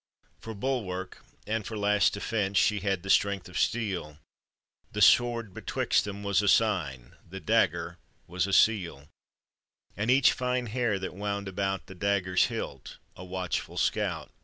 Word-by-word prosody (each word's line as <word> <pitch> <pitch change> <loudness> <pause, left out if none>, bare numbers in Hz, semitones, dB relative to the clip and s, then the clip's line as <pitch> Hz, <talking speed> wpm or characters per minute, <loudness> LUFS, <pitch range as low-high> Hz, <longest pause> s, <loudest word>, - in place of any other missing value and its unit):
For 110 -1 -8
bulwark 100 -6 -3 0.2
and 110 0 -2
for 110 +1 -6
last 105 0 +3
defense 100 -1 -1
She 105 +2 +3
had 95 -3 -1
the 95 - -7
strength 100 -2 +2
of 90 - -4
steel: 95 -10 -1 0.8
The - - -3
sword 115 -4 +4
betwixt - - 0
them 100 0 -6
was 100 -1 +2
a 105 - -1
sign, 90 - +1
The 95 +2 -7
dagger 85 - +1 0.3
was 90 +2 -1
a 100 - -3
seal; 85 -12 +2 0.9
And 105 +4 -2
each 130 +2 +6
fine 125 0 -1
hair 115 -2 0
that 95 -1 -5
wound 100 +1 -3
about 95 0 -2
The - - -11
dagger's 95 -1 +1
hilt, 70 - -6 0.2
a 90 - -10
watchful 90 -1 -4
scout. - - -1
100 Hz, 155 wpm, -28 LUFS, 95-110 Hz, 0.9 s, each